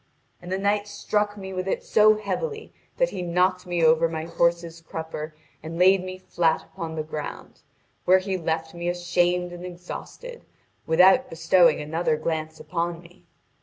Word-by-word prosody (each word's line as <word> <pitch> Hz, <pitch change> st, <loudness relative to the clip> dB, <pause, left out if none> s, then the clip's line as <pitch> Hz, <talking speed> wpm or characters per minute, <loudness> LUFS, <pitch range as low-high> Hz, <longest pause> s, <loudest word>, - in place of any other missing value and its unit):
And 175 Hz, -, -9 dB
the 190 Hz, -, 0 dB
knight 205 Hz, +1 st, 0 dB
struck 205 Hz, 0 st, -1 dB
me 190 Hz, -1 st, -7 dB
with 185 Hz, 0 st, -3 dB
it -, -, -1 dB
so 215 Hz, 0 st, +5 dB
heavily 435 Hz, -, -4 dB, 0.2 s
that -, -, +2 dB
he -, -, -4 dB
knocked 180 Hz, +1 st, +1 dB
me 175 Hz, -1 st, 0 dB
over 160 Hz, +1 st, +4 dB
my 160 Hz, -1 st, -4 dB
horse's 170 Hz, 0 st, 0 dB
crupper 160 Hz, -1 st, -6 dB, 0.3 s
and 160 Hz, +2 st, -7 dB
laid 185 Hz, +1 st, +5 dB
me 185 Hz, 0 st, -6 dB
flat 170 Hz, -3 st, 0 dB
upon 165 Hz, -4 st, -7 dB
the 155 Hz, -, -2 dB
ground, 155 Hz, -1 st, -7 dB, 0.4 s
where 185 Hz, +1 st, +6 dB
he 190 Hz, 0 st, -2 dB
left 160 Hz, -2 st, -2 dB
me 170 Hz, 0 st, -5 dB
ashamed 175 Hz, 0 st, 0 dB
and 175 Hz, 0 st, -9 dB
exhausted, 180 Hz, -, -8 dB, 0.4 s
without 190 Hz, +10 st, +5 dB
bestowing 165 Hz, 0 st, +4 dB
another 160 Hz, +1 st, -1 dB
glance 155 Hz, 0 st, -3 dB
upon 170 Hz, 0 st, -3 dB
me. 175 Hz, +1 st, -19 dB
175 Hz, 165 wpm, -25 LUFS, 165-190 Hz, 0.4 s, where